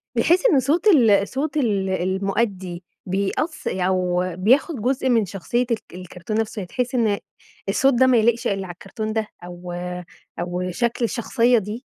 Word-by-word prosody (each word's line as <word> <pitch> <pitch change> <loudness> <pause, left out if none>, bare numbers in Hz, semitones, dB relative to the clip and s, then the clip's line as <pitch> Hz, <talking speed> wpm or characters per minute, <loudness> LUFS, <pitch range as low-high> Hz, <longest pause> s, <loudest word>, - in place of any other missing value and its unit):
بتحس 345 - +3
إنّ 325 - +5
صوت 305 - +1
ال 225 - +5
صوت 285 +2 -3
ال 205 -8 +1
المؤدي 190 0 -1 0.2
بيأث 200 - -2
أو 180 -1 0
بياخد 255 - +2
جزء 260 +2 0
من 230 -4 +3
شخصيّة 200 +6 -2
الك 225 - -1
الكرتون 180 +4 -5
نفسه 220 -2 -3
بتحس 245 +8 -3
إن 220 -4 +2 0.5
الصوت 270 +6 +3
ده 260 +2 +4
ما 250 -2 +5
يليقش 235 +2 +2
إلا 195 -1 -1
على 175 - -7
الكرتون 215 +4 -5
ده 220 -1 -1 0.2
أو 175 0 -8 0.7
أو 180 +1 -3
شكل 235 +4 0
الشخصيّة 235 +1 +2
دي؟ 220 +5 -4
215 Hz, 155 wpm, -22 LUFS, 185-250 Hz, 0.7 s, إنّ